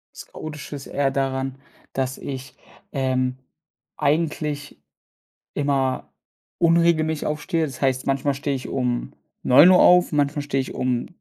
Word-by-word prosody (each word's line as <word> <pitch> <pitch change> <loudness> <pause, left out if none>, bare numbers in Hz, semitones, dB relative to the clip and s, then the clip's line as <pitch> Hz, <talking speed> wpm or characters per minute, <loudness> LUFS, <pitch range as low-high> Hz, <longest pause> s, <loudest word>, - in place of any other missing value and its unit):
Das - - -10
Chaotische 150 -1 -8
ist 140 - -8
eher 140 -1 0
daran, 135 -1 -2 0.4
dass 130 -1 -2
ich, 135 -1 -7 0.4
ähm, 130 -2 0 0.6
eigentlich 150 - -1 0.8
immer 135 -2 -1 0.5
unregelmäßig 165 -2 +3
aufstehe. 155 +2 -1
Das 135 -2 -9
heißt, 130 -1 +1
manchmal 135 +1 +1
stehe 140 0 -2
ich 130 - -7
um 125 -2 -2 0.3
9:00 160 +9 +7
auf, 180 -2 +6
manchmal 145 0 +1
stehe 140 -1 -1
ich 130 - -5
um 125 -1 -1
140 Hz, 130 wpm, -23 LUFS, 130-150 Hz, 0.8 s, 9:00